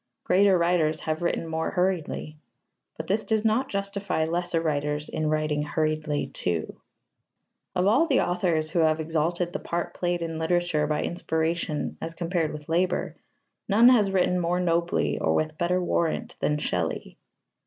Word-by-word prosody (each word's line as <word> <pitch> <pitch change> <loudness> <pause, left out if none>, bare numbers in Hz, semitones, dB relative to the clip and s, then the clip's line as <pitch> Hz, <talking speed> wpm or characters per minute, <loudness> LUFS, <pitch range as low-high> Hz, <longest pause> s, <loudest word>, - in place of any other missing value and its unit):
Greater 195 0 +4
writers 170 -3 +1
have 155 +1 -2
written 170 -1 -1
more 160 0 -2
hurriedly. 180 -4 -1 0.6
But 160 - -5
this 205 +5 0
does 220 0 0
not 240 +5 +2
justify 200 -4 -2
lesser 170 +1 -1
writers 150 -1 -1
in 155 -1 -1
writing 155 -1 0
hurriedly 155 -1 -1
too. 85 -3 -2 0.9
Of 180 0 +2
all 260 +12 +4
the 275 -5 +3
authors 170 -3 0
who 175 - +1
have 160 -1 +3
exalted 165 +2 -1
the - - -2
part 170 0 -3
played 175 -1 -1
in 165 -1 -4
literature 160 -2 +1
by 150 0 0
inspiration 160 -2 -2
as 165 0 -5
compared 170 -2 -1
with 150 -1 -8
labour, 175 +2 0 0.5
none 225 +5 +7
has 220 -6 +4
written 180 -1 +2
more 175 +1 0
nobly 170 -1 +1
or - - +1
with 155 0 -1
better 180 +1 +1
warrant 170 -2 -1
than 150 - +1
Shelley. 90 - -3
170 Hz, 155 wpm, -26 LUFS, 155-180 Hz, 0.9 s, none